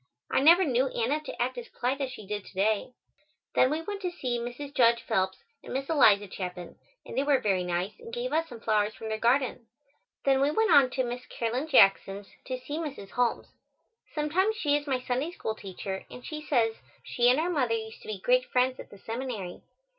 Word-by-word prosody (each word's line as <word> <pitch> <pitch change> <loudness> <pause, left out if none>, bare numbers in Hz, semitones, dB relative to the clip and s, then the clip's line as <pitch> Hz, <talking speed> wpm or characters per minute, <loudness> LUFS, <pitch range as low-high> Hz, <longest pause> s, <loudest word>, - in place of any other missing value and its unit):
I - - +3
never 340 +7 +7
knew 260 -2 +2
Anna 255 +4 0
to 305 - -8
act 250 +1 -1
as 235 - -9
polite 260 +3 -2
as 270 - -1
she 215 -5 -9
did 205 0 -4
to - - -14
day. 210 +5 +1 0.6
Then 255 - +4
we 310 +3 -2
went 405 +2 -5
to 365 - -1
see 255 -9 -3
Mrs. 245 +4 -6
Judge 235 -2 +4
Phelps 190 0 -1 0.2
and - - -9
Miss 270 +3 -2
Eliza 205 -9 +5
Chapin, 180 -2 -6 0.3
and - - -8
they - - +2
were 285 -1 +3
very 195 -6 +1
nice 180 - -2
and 460 -1 -10
gave 485 +1 -3
us 325 +1 +1
some 235 -2 -10
flowers 215 -1 +1
from 220 - -7
their 220 0 -2
garden. 245 0 +1 0.6
Then 270 -1 +4
we 280 - +4
went 440 +7 +2
on 270 -3 +7
to 260 0 -1
Miss 245 +1 -5
Caroline 245 +6 -2
Jackson's, 195 -6 +4 0.2
to 255 -1 -3
see 290 +5 -5
Mrs. 275 -11 -6
Holmes. 245 -1 -1 0.6
Sometimes 350 +8 +1
she 295 -9 +2
is 290 0 -2
my 260 -2 +1
Sunday 255 +5 -2
School 345 - -4
teacher, 190 -1 -6
and 250 - -11
she 305 -1 -5
says 230 -7 +1 0.3
she 240 0 +2
and 255 +4 +4
our 345 +3 0
mother 255 -8 +1
used 220 0 -6
to - - -13
be 215 -2 -3
great 255 +5 +3
friends 255 +1 +1
at - - -9
the 200 - -13
seminary. 225 -4 -5
250 Hz, 215 wpm, -28 LUFS, 220-290 Hz, 0.6 s, never